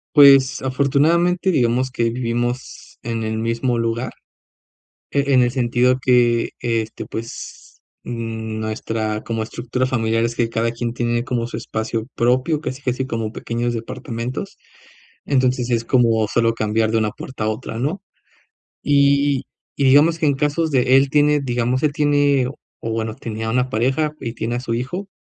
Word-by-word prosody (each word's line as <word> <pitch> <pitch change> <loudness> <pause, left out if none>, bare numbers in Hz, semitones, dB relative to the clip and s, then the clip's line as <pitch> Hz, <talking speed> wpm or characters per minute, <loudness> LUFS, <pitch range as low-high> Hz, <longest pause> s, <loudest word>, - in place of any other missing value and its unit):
Pues, 135 -2 +7
afortunadamente, 155 +8 +2
digamos 130 -2 +1
que 115 -2 0
vivimos 120 +1 -3
en 115 -1 -3
el 110 0 -2
mismo 115 +2 0
lugar, 115 +1 -2 1.0
e 140 -1 +1
en 130 -1 +6
el 120 0 +1
sentido 125 0 +2
que 120 -2 +3
este, 115 -2 -2
pues, 115 +1 -8 0.2
mm 110 -2 -5
nuestra 110 0 -3
como 115 -1 -3
estructura 120 +3 -2
familiar 115 -2 0
es 115 0 -1
que 115 -1 0
cada 115 0 0
quien 120 0 -3
tiene 120 -1 -1
como 120 -2 -2
su 115 - -6
espacio 110 +1 -3
propio, 130 +6 +2
casi 135 -1 -5
casi 130 0 -1
como 115 -3 -3
pequeños 120 0 -2
departamentos. 120 - -5 0.7
Entonces 130 -2 +1
es 115 -1 +1
como 115 -4 +3
solo 115 0 +2
cambiar 110 0 0
de 115 - +3
una 105 -1 0
puerta 130 -4 -6
a 110 - +1
otra, 110 +1 -5
¿no? 155 +11 -2 0.8
Y 140 -1 +3 0.3
y 140 - 0
digamos 150 +5 +5
que 160 - +1
en 140 - +2
casos 150 +3 0
de 130 0 +4
él 135 0 +3
tiene, 150 0 +3
digamos, 125 0 0
él 145 -2 +2
tiene 145 -3 +2 0.3
o 115 - -3
bueno, 110 -1 -2
tenía 110 0 -5
una 125 +2 +1
pareja 130 +7 +1
y 115 -2 -4
tiene 120 +1 -3
a - - -1
su 115 -3 -3
hijo. 155 +12 -3
120 Hz, 160 wpm, -20 LUFS, 115-135 Hz, 1.0 s, Pues